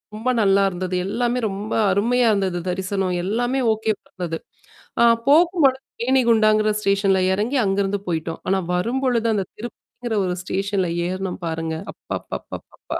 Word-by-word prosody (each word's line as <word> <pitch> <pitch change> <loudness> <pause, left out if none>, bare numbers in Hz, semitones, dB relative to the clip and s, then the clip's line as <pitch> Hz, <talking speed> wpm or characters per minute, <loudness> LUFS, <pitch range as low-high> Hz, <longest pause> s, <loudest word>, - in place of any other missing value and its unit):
ரொம்ப 225 +4 -2
நல்லா 200 -1 +4
இருந்தது. 185 0 -4
எல்லாமே 240 +4 0
ரொம்ப 200 +2 -6 0.2
அருமையா 235 +5 +2
இருந்தது. 190 -3 0
தரிசனம். 190 0 -1
எல்லாமே 245 +6 0
ஓகே 220 0 -1 0.2
பந்தது. 175 -3 -5 0.6
ஆ - - +7 0.2
போக்கும்பழும் 305 -3 +4 0.2
தேணிகண்டாங்கிற 225 -4 +3
ஸ்டேஷன்ல 195 -1 +2
இறங்கி 220 +8 0
அங்கிருந்து 195 +1 0
போயி்டோம். 165 -1 -3
ஆனா 195 - +2 0.2
வரும்பொழுது 235 +4 0
அந்த 200 -3 -1
திருப்பிங்கிற 235 0 -7
ஒரு 180 -1 -1
ஸ்டேஷன்ல 195 -1 -1 0.2
ஏறணும்ம் 185 +1 -4
பாருங்க. 160 0 -3 0.2
அப்பப்பப்பப்பப்பா. - - -7
200 Hz, 125 wpm, -22 LUFS, 190-235 Hz, 0.6 s, ஆ